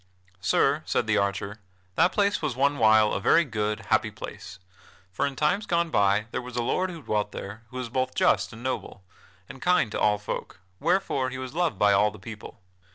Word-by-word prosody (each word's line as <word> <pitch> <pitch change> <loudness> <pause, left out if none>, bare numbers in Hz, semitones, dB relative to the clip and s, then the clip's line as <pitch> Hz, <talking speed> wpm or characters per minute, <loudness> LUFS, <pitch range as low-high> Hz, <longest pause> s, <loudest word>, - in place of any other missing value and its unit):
"Sir," 140 +9 +2
said - - +1
the 110 -1 +2
archer, 100 +1 -2 0.3
"that 180 - +3
place 200 0 +1
was 145 -6 -2
one 140 +2 +1
while 110 -1 +5
a - - 0
very 165 +9 +4
good, 105 -3 -2
happy - - +3
place; 90 - -9 0.5
for 95 - 0
in 140 - -5
times 165 +9 0
gone 170 -1 +1
by 100 -1 +3
there - - -2
was 125 -1 -9
a 120 - 0
lord 185 +10 0
who 165 -4 -9
dwelt 105 -2 -1
there 105 +3 -7
who 130 - -8
was 125 -2 -4
both 130 +1 -1
just - - +2
and 115 +1 -11
noble, 130 -6 -4 0.4
and 135 - -11
kind 180 -11 +2
to - - -3
all 105 -1 +3
folk, 105 -3 -6 0.2
wherefore 165 -6 +1
he 130 - -6
was 130 0 -6
loved 170 - 0
by 105 0 +4
all 100 +2 +4
the 105 - -12
people. 105 +1 -10
120 Hz, 210 wpm, -26 LUFS, 105-145 Hz, 0.5 s, while